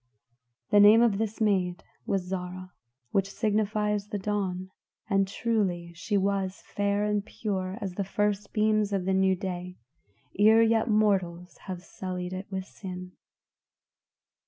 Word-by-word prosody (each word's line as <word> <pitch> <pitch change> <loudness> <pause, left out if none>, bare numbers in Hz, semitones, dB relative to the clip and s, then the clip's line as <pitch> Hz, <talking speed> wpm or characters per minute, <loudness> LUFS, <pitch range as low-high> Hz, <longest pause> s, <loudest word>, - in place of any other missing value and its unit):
The 205 - +6
name 210 +3 +8
of 215 -4 +2
this 220 -1 -2
maid 190 -5 +1 0.2
was 195 -2 0
Zarah, 185 0 -6 0.4
which 195 0 +1
signifies 210 -1 0
the 210 - -3
Dawn; 190 -2 -2 0.4
and 195 -2 +2
truly 190 -6 -1
she 200 +4 -1
was 195 -1 -1
fair 205 0 0
and 210 -1 0
pure 195 -3 -3
as 195 -3 -3
the 200 - -2
first 205 +1 -1
beams 215 -1 +2
of 190 -2 0
the 190 - +1
new 190 0 +3
day, 180 -1 -5 0.6
ere 220 +2 +7
yet 225 +1 +2
mortals 190 -5 +1
have 180 -2 -5
sullied 180 -1 -5
it 185 +1 -5
with 190 -1 -4
sin. 185 -2 -8
195 Hz, 140 wpm, -28 LUFS, 185-210 Hz, 0.6 s, name